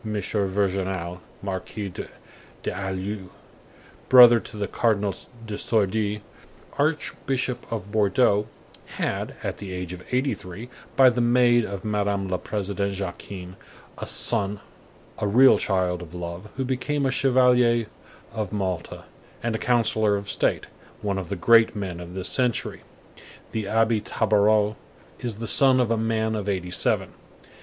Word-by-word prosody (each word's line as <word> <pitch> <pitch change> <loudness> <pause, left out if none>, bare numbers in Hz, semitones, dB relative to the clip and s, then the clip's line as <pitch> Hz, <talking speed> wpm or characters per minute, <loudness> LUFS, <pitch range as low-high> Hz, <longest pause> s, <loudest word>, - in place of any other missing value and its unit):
Virginal, 95 -3 -1 0.2
Marquis 95 0 -5 0.7
d'Alluye, 95 +1 -4 0.8
brother 120 -2 +9
to 110 - -10
the 100 -1 -2
Cardinal 105 -4 +1 0.3
de 105 -2 -5
Sourdis, 105 0 0 0.6
Archbishop 135 -4 -1
of 105 -3 -4
Bordeaux, 105 0 +3 0.5
had, - - -2
at - - -3
the 100 -2 -7
age 90 -1 -5
of 90 0 -9
eighty 130 +1 +1
three, 95 +5 -9 0.3
by 135 -1 +7
the 125 -1 +3
maid 120 0 +4
of 100 -2 -6
Madame 100 -2 0
la 90 -1 -1
Présidente 100 -1 -2
Jacquin, 95 -1 -6 0.4
a - - -5
son, 105 -3 +1 0.6
a 105 - 0
real 125 +6 +6
child 90 -2 0
of 90 0 -10
love, 85 +4 -6
who 135 - -1
became 135 +3 -1
a 135 - +2
Chevalier 125 -3 +3 0.5
of 105 -3 -4
Malta 95 -5 -3 0.4
and 120 -1 0
a 110 - -2
counsellor 110 -3 +2
of 100 0 -4
state; - - 0 0.4
one 100 -2 -1
of 90 -3 -7
the - - -2
great 115 +5 +5
men 95 -4 -4
of 90 +1 -9
this 95 -1 -2
century, 125 -3 -1 0.7
the 110 -2 -2
Abbé 110 +1 +2
Tabaraud, 105 0 +2 0.4
is 120 -3 -3
the 115 +2 -6
son 130 +3 +5
of 120 -2 +1
a - - +3
man 110 0 0
of 105 -2 -2
eighty 90 -2 -2
seven. - - 0
105 Hz, 140 wpm, -25 LUFS, 95-115 Hz, 0.8 s, brother